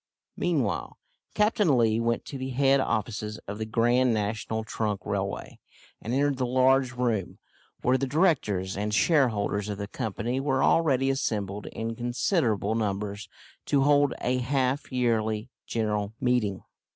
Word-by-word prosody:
Meanwhile 145 - -1 0.4
Captain 210 - +3
Lee 115 -1 +3
went 115 0 0
to 135 - -7
the 130 0 -4
head 135 +1 +3
offices 110 -3 -2
of 100 +2 -5
the 110 - -3
Grand 120 +2 +3
National 110 +1 -2
Trunk 105 -3 -3
Railway, 100 0 -3 0.4
and 115 - -5
entered 140 +1 +1
the 125 -1 0
large 130 +1 +3
room, 120 -6 -1 0.5
where 130 +1 +3
the 135 - -1
directors 130 - +1
and 105 +2 -1
shareholders 105 - +2
of 105 - -3
the 100 0 -4
Company 115 +5 -3
were 135 -1 +1
already 135 -5 +3
assembled 105 -6 -2
in 115 0 -4
considerable 120 - 0
numbers 100 -2 -3 0.4
to 140 -2 +3
hold 145 -1 +3
a 125 +1 0
half 130 +2 -1
yearly 115 -3 0 0.2
general 105 -2 -1
meeting. 120 -6 0
120 Hz, 140 wpm, -27 LUFS, 105-135 Hz, 0.5 s, Captain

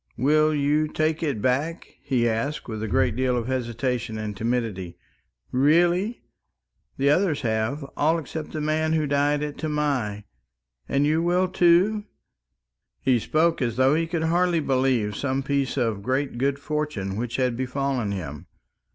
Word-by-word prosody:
"Will 155 +4 +3
you 150 +2 +2
take 155 +1 -1
it 140 -10 -2
back?" 145 +7 -1
he 125 -3 +1
asked, 115 +7 -2
with 110 -2 -5
a 110 - -2
great 105 - +1
deal 125 0 +1
of 120 - -2
hesitation 120 -2 -2
and 105 -1 -4
timidity. 110 -6 -2 0.5
"Really? 175 - +2 0.7
The 140 +1 +3
others 165 -3 +2
have, 110 +4 -1
all 160 +3 +2
except 160 0 -6
the 155 - -4
man 155 +1 0
who 155 -1 +1
died 145 +1 +1
at 150 -1 -5
Tamai. 140 -9 -1 0.7
And 140 +1 +2
you 155 +2 +2
will 180 +2 +2
too!" 185 +4 +3 0.9
He 130 -2 +2
spoke 160 +7 +1
as 120 -3 0
though 130 +2 +4
he 165 +1 +1
could 165 -1 -2
hardly 175 +1 +2
believe 130 -7 +1
some 135 +3 -1
piece 140 0 -1
of 115 -5 0
great 130 +2 -1
good 140 +1 +1
fortune 145 -10 -3
which 115 +2 -3
had 125 -2 +1
befallen 130 -3 -1
him. 75 -7 -6
140 Hz, 155 wpm, -25 LUFS, 120-155 Hz, 0.9 s, though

